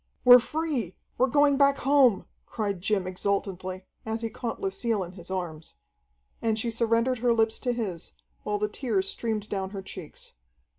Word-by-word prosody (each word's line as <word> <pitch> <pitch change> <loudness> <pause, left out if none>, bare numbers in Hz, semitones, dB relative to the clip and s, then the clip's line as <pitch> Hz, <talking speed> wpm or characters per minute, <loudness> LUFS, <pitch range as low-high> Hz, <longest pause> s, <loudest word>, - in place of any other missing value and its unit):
"We're 250 0 +10
free, 265 - -3 0.2
we're 260 - +5
going 285 +2 +4
back 280 0 +4
home!" 270 -7 +4 0.2
cried 200 -5 -3
Jim 195 -1 0
exultantly, 185 0 -3 0.2
as 220 +1 -3
he 225 - -2
caught 235 -3 -4
Lucille 235 - -1
in 175 - -8
his 180 -1 -13
arms. 170 -4 -5 0.7
And 220 -1 +1
she 230 +1 -1
surrendered 230 +2 +1
her 240 0 +3
lips 225 0 +2
to 250 - -1
his, 200 -8 -4 0.3
while 210 0 -1
the 210 +1 0
tears 210 -4 -1
streamed 215 -1 -2
down 190 -2 -3
her 195 -1 -7
checks. 185 -5 -10
220 Hz, 165 wpm, -27 LUFS, 190-245 Hz, 0.7 s, We're